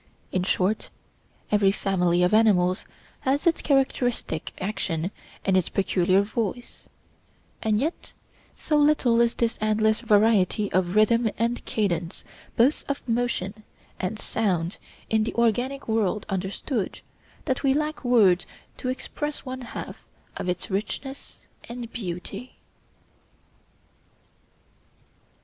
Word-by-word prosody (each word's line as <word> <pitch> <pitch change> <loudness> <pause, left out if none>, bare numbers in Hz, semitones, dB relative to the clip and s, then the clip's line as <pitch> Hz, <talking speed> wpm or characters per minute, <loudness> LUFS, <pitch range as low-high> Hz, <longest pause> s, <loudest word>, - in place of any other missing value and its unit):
In 185 - +1
short, 190 +3 0 0.6
every 205 -2 +4
family 180 -3 +1
of 180 - +2
animals 190 -5 +3 0.3
has 275 +5 0
its 335 -1 +3
characteristic 250 - 0
action 185 -3 -2 0.3
and 190 - +3
its 185 -3 +2
peculiar 190 0 +2
voice; 225 +2 -4 0.7
and 215 -1 +2
yet 315 +7 -3 0.4
so 300 - 0
little 290 -6 +4
is 235 -1 +2
this 235 0 0
endless 215 0 +2
variety 210 -3 +3
of 185 0 +1
rhythm 225 +2 +4
and 235 +2 0
cadence 175 -4 -1 0.3
both 255 +6 +3
of 280 -2 -3
motion 225 -4 -1 0.4
and 190 +4 -2
sound 185 -6 -1 0.3
in 220 -1 +2
the 225 - -3
organic 245 +4 +1
world 215 -2 0
understood, 195 +4 -3 0.4
that 260 -4 0
we 270 -1 +3
lack 305 0 -2
words 210 -8 +4 0.3
to 255 - -2
express 295 +3 -4
one 260 0 -5
half 240 - -7 0.4
its 180 +2 -3
richness 265 +7 -4 0.3
and 235 -1 -7
beauty. 195 +4 -6
220 Hz, 115 wpm, -25 LUFS, 190-245 Hz, 0.7 s, every